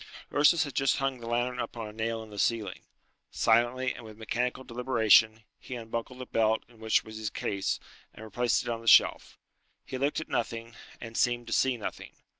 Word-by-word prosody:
Ursus 150 +4 +5
had 140 -3 -6
just 135 -1 +2
hung 135 -2 -1
the 115 - -8
lantern 120 +1 -1
up 120 0 -4
on 115 -2 -4
a 105 - -10
nail 115 +1 -2
in 110 - -13
the 105 - -7
ceiling. 110 -5 0 0.5
Silently, 120 +3 +2
and 125 - -11
with 110 -1 -11
mechanical 125 +3 -2
deliberation, 115 -3 +3 0.2
he 125 - -7
unbuckled 115 +2 -5
the 130 - -6
belt 110 -2 +1
in 115 -2 -21
which 110 0 +2
was 110 0 -9
his 110 -1 -3
case, 100 -1 -2 0.3
and 110 - -11
replaced 120 +2 0
it - - -5
on 115 -1 -3
the 115 - -12
shelf. - - +5 0.5
He 130 - -5
looked 140 +3 0
at 155 - -6
nothing, 115 -1 -3 0.3
and 115 -1 -9
seemed 120 0 +1
to 115 - -4
see 130 -2 +2
nothing. 105 - -7
115 Hz, 205 wpm, -29 LUFS, 110-125 Hz, 0.5 s, Ursus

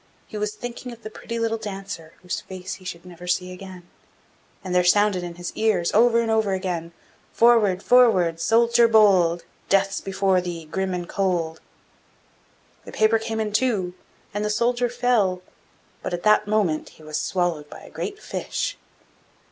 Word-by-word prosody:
He - - -12
was 210 0 -2
thinking 245 +1 -7
of 235 -1 -13
the 215 - -7
pretty 230 +2 -6
little 225 -1 -1
Dancer, 195 -6 -7
whose 180 - -3
face 185 0 -7
he - - -15
should 175 -1 -7
never 180 0 -11
see 180 +1 0
again, 180 -1 -11 0.8
and 185 -2 -4
there 180 0 +4
sounded 205 +1 +3
in 175 -1 -6
his 175 0 -6
ears, 210 -6 +1
over 235 +1 +5
and 225 -1 -1
over 220 -3 +2
again: 180 -3 -3 0.4
'Forward, 220 -6 +4
forward, 185 -10 +4
soldier 235 +4 +4
bold! 190 -6 +4 0.3
Death's 195 0 +2
before 195 -1 +1
thee, 170 -2 -6
grim 190 +4 -2
and 175 -1 -5
cold!' 170 -5 -1 1.2
The - - -10
paper 220 +1 +3
came 220 0 -4
in 215 -1 -2
two, 210 -7 +1 0.4
and 205 +1 -2
the 210 - -1
soldier 240 +3 +1
fell 230 -7 +1 0.6
but 175 - -2
at 175 - -8
that 215 0 +4
moment 205 -7 0
he 155 - -16
was 155 0 -4
swallowed 175 -5 -1
by - - -11
a - - -14
great 410 0 -5
fish. - - -4
195 Hz, 170 wpm, -23 LUFS, 180-220 Hz, 1.2 s, over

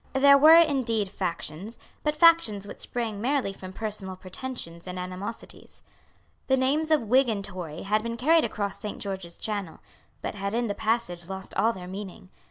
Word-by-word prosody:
There 280 +1 +7
were, 310 +4 +9
indeed, 250 - +2
factions, 185 +2 -4 0.2
but 300 0 0
factions 305 - +4
which - - -9
sprang 225 -4 -3
merely 255 -4 0
from 185 -1 -9
personal 200 -2 -4
pretensions 185 -3 -7
and 180 0 -5
animosities. 185 +4 -7 0.6
The 265 - +3
names 290 +5 +1
of 310 -5 +3
Whig 255 +3 +4
and 200 -3 -1
Tory 175 -5 -7
had 210 +2 +1
been 230 +1 -4
carried 315 +6 +4
across 205 -1 -3
Saint 210 -2 -5
George's 190 -4 -5
Channel, 200 -6 -3 0.4
but - - -3
had 200 +1 -3
in 240 0 +1
the 205 - -1
passage 215 -6 -2
lost 190 0 -7
all 225 - +3
their 185 -5 -8
meaning. 190 0 -8
210 Hz, 175 wpm, -27 LUFS, 190-260 Hz, 0.6 s, were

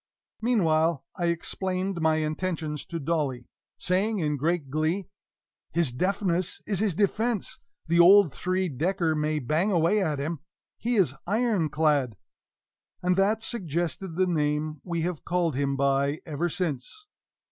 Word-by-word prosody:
Meanwhile 165 - +2
I 175 -2 -1
explained 185 +2 -2
my 160 0 +3
intentions 155 -1 -2
to 170 - -4
Dolly, 140 -5 -1 0.3
saying 200 +5 0
in 150 -5 0
great 150 -1 -1
glee: 160 +5 -1 0.6
"His 165 -5 +1
deafness 185 +4 0
is 200 -4 -1
his 205 -5 +1
defense: 215 +2 0 0.3
the 170 +1 +2
old 180 -3 +7
three 185 +1 -1
decker 165 +3 0
may 155 0 0
bang 155 - +1
away 175 +4 +3
at 155 -4 -1
him; 150 +3 -3 0.4
he 240 +1 0
is 185 - +3
IRON 210 -5 +1
CLAD!" 145 -8 +1 0.9
And 180 0 +3
that 210 +4 +2
suggested 175 - -3
the 185 +1 +3
name 150 -3 -1
we 170 -2 -2
have 175 -3 -3
called 175 -4 0
him 140 0 0
by 140 +1 +1
ever 165 +2 -2
since. 175 - -4
170 Hz, 140 wpm, -27 LUFS, 150-190 Hz, 0.9 s, old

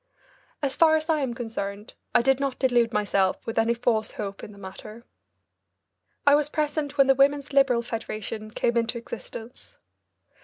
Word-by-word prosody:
As 270 -2 0
far 320 -1 +5
as 310 +1 -2
I 315 -1 +3
am 260 -4 -2
concerned, 210 -4 -5 0.2
I - - +5
did 270 +1 +3
not 275 -2 -2
delude 240 -3 +2
myself 200 -3 0
with 225 0 -1
any 230 +1 +2
false 230 -2 0
hopes 200 -2 -6
in - - -8
the 200 - -15
matter. 210 +4 -10 1.2
I 285 - +7
was 295 0 +3
present 295 -1 -2
when 275 - +6
the 270 - +5
Women's 280 +1 +2
Liberal 265 -4 +4
Federation 220 -2 -5
came 235 +2 -1
into 230 +1 0
existence. 230 0 -9
235 Hz, 165 wpm, -26 LUFS, 220-275 Hz, 1.2 s, I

